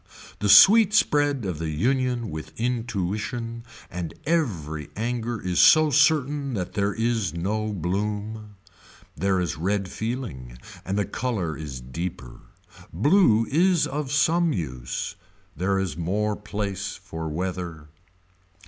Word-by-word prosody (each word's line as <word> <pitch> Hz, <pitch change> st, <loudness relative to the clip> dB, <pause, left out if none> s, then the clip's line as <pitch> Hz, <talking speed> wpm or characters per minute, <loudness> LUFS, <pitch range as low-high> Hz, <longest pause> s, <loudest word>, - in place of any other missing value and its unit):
The 105 Hz, -, 0 dB
sweet 210 Hz, -, +8 dB
spread 145 Hz, -, +2 dB
of 90 Hz, -5 st, -3 dB
the 80 Hz, -1 st, -3 dB
union 125 Hz, -, 0 dB
with 75 Hz, +2 st, -8 dB
intuition 115 Hz, 0 st, -2 dB, 0.3 s
and 90 Hz, -2 st, -5 dB
every 85 Hz, -, -1 dB
anger 115 Hz, +1 st, -2 dB
is 90 Hz, -1 st, -1 dB
so 155 Hz, -1 st, +7 dB
certain 145 Hz, -3 st, +2 dB
that 90 Hz, -3 st, -4 dB
there 100 Hz, -1 st, 0 dB
is 115 Hz, -7 st, 0 dB
no 105 Hz, +5 st, -2 dB
bloom. 105 Hz, +3 st, -3 dB, 0.6 s
There 95 Hz, +3 st, +1 dB
is 85 Hz, -4 st, -2 dB
red 95 Hz, +3 st, -1 dB
feeling 95 Hz, -, -5 dB, 0.3 s
and 95 Hz, +2 st, -2 dB
the 105 Hz, -, +1 dB
color 100 Hz, -9 st, -2 dB
is 70 Hz, -5 st, -7 dB
deeper. 65 Hz, -1 st, -6 dB, 0.5 s
Blue 115 Hz, -, +4 dB
is 175 Hz, +3 st, +3 dB
of 140 Hz, -1 st, -4 dB
some 165 Hz, +3 st, +3 dB
use. 65 Hz, -8 st, -4 dB, 0.4 s
There 95 Hz, +4 st, 0 dB
is 95 Hz, -6 st, -2 dB
more 100 Hz, +6 st, -1 dB
place 105 Hz, -2 st, -4 dB
for 80 Hz, -1 st, -6 dB
weather. 85 Hz, -2 st, -4 dB
105 Hz, 125 wpm, -25 LUFS, 85-125 Hz, 0.6 s, sweet